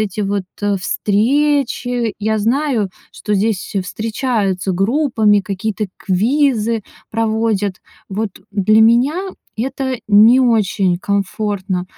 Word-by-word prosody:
эти 210 Hz, -1 st, -2 dB
вот, 200 Hz, -1 st, -1 dB, 0.2 s
э, 205 Hz, -1 st, +1 dB
встречи. 245 Hz, +3 st, 0 dB
Я 220 Hz, +1 st, 0 dB
знаю, 235 Hz, -2 st, 0 dB, 0.2 s
что 210 Hz, -, -3 dB
здесь 205 Hz, -1 st, -1 dB
встречаются 210 Hz, -2 st, -2 dB
группами, 215 Hz, -, +2 dB
какие-то 200 Hz, +2 st, -3 dB
квизы 230 Hz, +2 st, +1 dB, 0.3 s
проводят. 220 Hz, -3 st, 0 dB, 0.3 s
Вот 205 Hz, +2 st, -2 dB, 0.2 s
для 210 Hz, +2 st, +3 dB
меня 260 Hz, -, +3 dB, 0.3 s
это 260 Hz, +1 st, -2 dB
не 220 Hz, +5 st, +6 dB
очень 205 Hz, -7 st, +2 dB
комфортно. 200 Hz, -2 st, -2 dB
215 Hz, 100 wpm, -17 LUFS, 200-240 Hz, 0.3 s, не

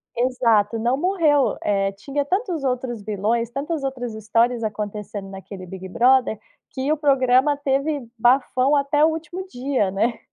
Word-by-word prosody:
Exato, 230 Hz, -4 st, +2 dB
não 240 Hz, +4 st, +1 dB
morreu. 320 Hz, -6 st, +2 dB
Eh, 195 Hz, -1 st, +1 dB
tinha 275 Hz, +8 st, -3 dB
tantos 360 Hz, -, -1 dB
outros 250 Hz, -3 st, -2 dB
vilões, 220 Hz, +3 st, -1 dB
tantas 280 Hz, +4 st, -3 dB
outras 250 Hz, -4 st, -4 dB
histórias 230 Hz, +3 st, +1 dB
acontecendo 210 Hz, -1 st, -5 dB
naquele 195 Hz, -1 st, -9 dB
Big 190 Hz, +1 st, -8 dB
Brother, 245 Hz, +2 st, +3 dB, 0.3 s
que 265 Hz, +2 st, -2 dB
o 310 Hz, -, +2 dB
programa 270 Hz, 0 st, +3 dB
teve 280 Hz, 0 st, -1 dB
bafão 255 Hz, +3 st, +3 dB
até 290 Hz, +1 st, +2 dB
o -, -, +4 dB
último 325 Hz, +3 st, -5 dB
dia, 255 Hz, -, -1 dB
né. 220 Hz, +5 st, -1 dB
250 Hz, 145 wpm, -22 LUFS, 215-285 Hz, 0.3 s, o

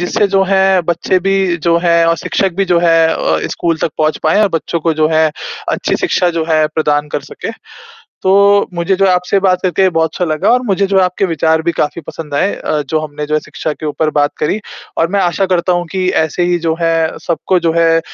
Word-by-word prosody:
जिससे 200 Hz, +4 st, +1 dB
जो 195 Hz, -, +4 dB
है 190 Hz, -1 st, +3 dB
बच्चे 175 Hz, +2 st, 0 dB
भी 190 Hz, -3 st, +1 dB
जो 170 Hz, +1 st, +1 dB
है 170 Hz, -1 st, +4 dB
और 165 Hz, -, +2 dB
शिक्षक 190 Hz, +5 st, -1 dB
भी 195 Hz, -, +1 dB
जो -, -, +4 dB
है 165 Hz, -1 st, +4 dB
अ, -, -, 0 dB
स्कूल 165 Hz, -2 st, -1 dB
तक 160 Hz, -, 0 dB
पहुँच 155 Hz, 0 st, +1 dB
पाएँ 160 Hz, +7 st, +2 dB
और 205 Hz, -, +3 dB
बच्चों 170 Hz, +1 st, -4 dB
को 165 Hz, 0 st, 0 dB
जो 155 Hz, 0 st, +2 dB
है 160 Hz, -1 st, +2 dB, 0.4 s
अच्छी -, -, -1 dB
शिक्षा 180 Hz, -1 st, +1 dB
जो 160 Hz, -, 0 dB
है 155 Hz, -1 st, +3 dB
प्रदान 150 Hz, -2 st, 0 dB
कर -, -, -3 dB
सकें। -, -, -6 dB, 0.7 s
तो 190 Hz, -, +2 dB, 0.4 s
मुझे 170 Hz, +2 st, 0 dB
जो 195 Hz, +1 st, +2 dB
है 190 Hz, -, +3 dB
आपसे 180 Hz, +2 st, +1 dB
बात 185 Hz, -2 st, +2 dB
करके 190 Hz, +1 st, +2 dB
बहुत 160 Hz, 0 st, +2 dB
अच्छा 180 Hz, -, -1 dB
लगा 155 Hz, -2 st, 0 dB
और 250 Hz, +1 st, +3 dB
मुझे 200 Hz, -1 st, +1 dB
जो 195 Hz, 0 st, +2 dB
आपके 185 Hz, +1 st, +1 dB
विचार 160 Hz, -1 st, +1 dB
भी 170 Hz, +1 st, 0 dB
काफ़ी 150 Hz, +1 st, -2 dB
पसंद 150 Hz, -3 st, -8 dB
आए 195 Hz, +8 st, +1 dB
अ, 150 Hz, -, -2 dB
जो 160 Hz, -, +1 dB
हमने 150 Hz, -1 st, -5 dB
जो 155 Hz, -, -4 dB
है 155 Hz, -, +3 dB
शिक्षा 155 Hz, -, -5 dB
के 155 Hz, -, -9 dB
ऊपर 155 Hz, +1 st, -1 dB
बात 145 Hz, 0 st, +1 dB
करी 190 Hz, +8 st, -1 dB, 0.4 s
और 165 Hz, -, +2 dB
मैं -, -, +3 dB
आशा 180 Hz, +1 st, +1 dB
करता 180 Hz, -1 st, +1 dB
हूँ 175 Hz, 0 st, -1 dB
कि 185 Hz, -1 st, -1 dB, 0.2 s
ऐसे 160 Hz, +3 st, -2 dB
ही 175 Hz, 0 st, +1 dB
जो 165 Hz, -1 st, 0 dB
है, 165 Hz, -1 st, 0 dB
सबको 180 Hz, +2 st, 0 dB
जो 165 Hz, -1 st, 0 dB
है 165 Hz, 0 st, +3 dB
170 Hz, 235 wpm, -14 LUFS, 160-185 Hz, 0.7 s, जो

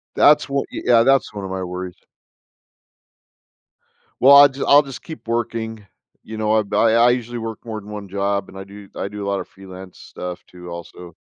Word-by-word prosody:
That's 150 Hz, +1 st, +5 dB
w 140 Hz, -1 st, -1 dB
y -, -, -6 dB
yeah, 115 Hz, -2 st, +5 dB
that's 135 Hz, -1 st, +2 dB
1 100 Hz, -1 st, -6 dB
of 95 Hz, -, -7 dB
my 95 Hz, 0 st, -4 dB
worries. 90 Hz, 0 st, -6 dB, 2.3 s
Well, 140 Hz, +2 st, +8 dB
I'll 145 Hz, 0 st, +9 dB
just 135 Hz, +1 st, -5 dB
I'll 145 Hz, +1 st, +7 dB
just 135 Hz, -3 st, -10 dB
keep 160 Hz, -7 st, -10 dB
working, 115 Hz, -2 st, -3 dB, 0.4 s
you 110 Hz, 0 st, -8 dB
know, 110 Hz, 0 st, 0 dB
I 110 Hz, -, +2 dB
ba 100 Hz, -, -3 dB
I 115 Hz, +1 st, +4 dB
usually 120 Hz, -1 st, -3 dB
work 115 Hz, -1 st, -6 dB
more 110 Hz, -2 st, -5 dB
than 105 Hz, 0 st, -12 dB
1 105 Hz, -2 st, -8 dB
job 100 Hz, 0 st, -2 dB
and 95 Hz, -, -12 dB
I 95 Hz, -, -7 dB
do 100 Hz, 0 st, -13 dB
I -, -, -3 dB
do 100 Hz, 0 st, -7 dB
a -, -, -4 dB
lot 100 Hz, 0 st, -1 dB
of -, -, -7 dB
freelance 95 Hz, -1 st, -13 dB
stuff, 90 Hz, 0 st, -8 dB
too, 90 Hz, -1 st, -12 dB
also. 85 Hz, 0 st, -10 dB
105 Hz, 210 wpm, -20 LUFS, 95-120 Hz, 2.3 s, I'll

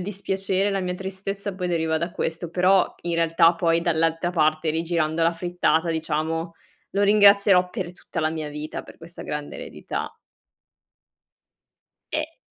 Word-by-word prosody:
dispiacere, 195 Hz, 0 st, -1 dB
la 195 Hz, -1 st, -1 dB
mia 180 Hz, -1 st, -2 dB
tristezza 195 Hz, +1 st, -5 dB
poi 180 Hz, -1 st, -3 dB
deriva 160 Hz, -2 st, 0 dB
da 170 Hz, +2 st, -3 dB
questo; 165 Hz, 0 st, -3 dB
però 185 Hz, +2 st, +3 dB
in 170 Hz, -1 st, -2 dB
realtà 165 Hz, 0 st, +4 dB
poi 165 Hz, -1 st, +2 dB
dall'altra 165 Hz, +1 st, +1 dB
parte, 155 Hz, -1 st, +1 dB
rigirando 165 Hz, 0 st, 0 dB
la 165 Hz, +1 st, +3 dB
frittata 175 Hz, -1 st, +1 dB
diciamo, 160 Hz, +1 st, -2 dB, 0.4 s
lo 200 Hz, +1 st, 0 dB
ringrazierò 200 Hz, -2 st, +6 dB
per 180 Hz, -5 st, -4 dB
tutta 180 Hz, -, -6 dB
la 155 Hz, -, +1 dB
mia 155 Hz, -1 st, -4 dB
vita 150 Hz, +1 st, -6 dB
per -, -, -14 dB
questa 165 Hz, +1 st, -10 dB
grande 150 Hz, -1 st, -5 dB
eredità. -, -, -6 dB, 2.0 s
E 310 Hz, +1 st, -3 dB
170 Hz, 145 wpm, -24 LUFS, 160-190 Hz, 2.0 s, ringrazierò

